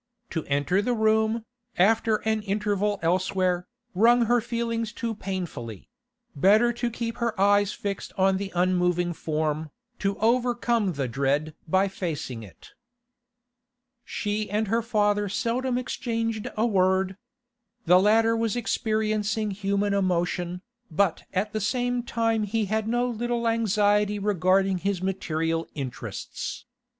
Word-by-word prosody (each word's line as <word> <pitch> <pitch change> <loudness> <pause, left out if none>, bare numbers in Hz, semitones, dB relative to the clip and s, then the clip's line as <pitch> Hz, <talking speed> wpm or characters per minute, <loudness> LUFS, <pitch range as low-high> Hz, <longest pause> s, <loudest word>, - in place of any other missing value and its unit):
To 160 - -2
enter 145 +7 +1
the 245 +3 0
room, 220 +1 +2 0.3
after 220 +4 +3
an 220 -1 +1
interval 205 0 0
elsewhere, 180 +1 +1 0.3
wrung 235 +5 +5
her 240 +1 +3
feelings 230 -1 -2
too 230 +1 -3
painfully; 175 - -6 0.5
better 215 +10 +4
to 240 0 -2
keep 230 0 -4
her 235 -4 -2
eyes 205 0 +4
fixed 200 -1 -4
on 190 0 +3
the 195 0 -4
unmoving 180 -1 +1
form, 155 -1 -2 0.3
to 195 0 -1
overcome 235 -3 +1
the 135 -3 -2
dread 140 +5 0
by 190 +4 +3
facing 155 -11 -4
it. 95 -7 -14 1.3
She 210 -2 -3
and 210 +1 -1
her 230 +2 +2
father 205 -3 +1
seldom 245 +4 -1
exchanged 230 -3 -2
a 220 - +2
word. 190 -2 +2 0.7
The 180 +1 +6
latter 225 +3 +4
was 230 0 0
experiencing 215 -2 0
human 200 +1 0
emotion, 180 -1 -1 0.3
but 175 +1 +1
at 200 +3 -1
the 215 - -1
same 245 +3 0
time 230 -2 0
he 215 +1 0
had 215 +2 -1
no 240 +2 +1
little 240 0 -1
anxiety 210 -2 +2
regarding 195 -1 +2
his 200 0 -1
material 165 -3 -1
interests. 135 -4 -6
205 Hz, 130 wpm, -26 LUFS, 185-225 Hz, 1.3 s, The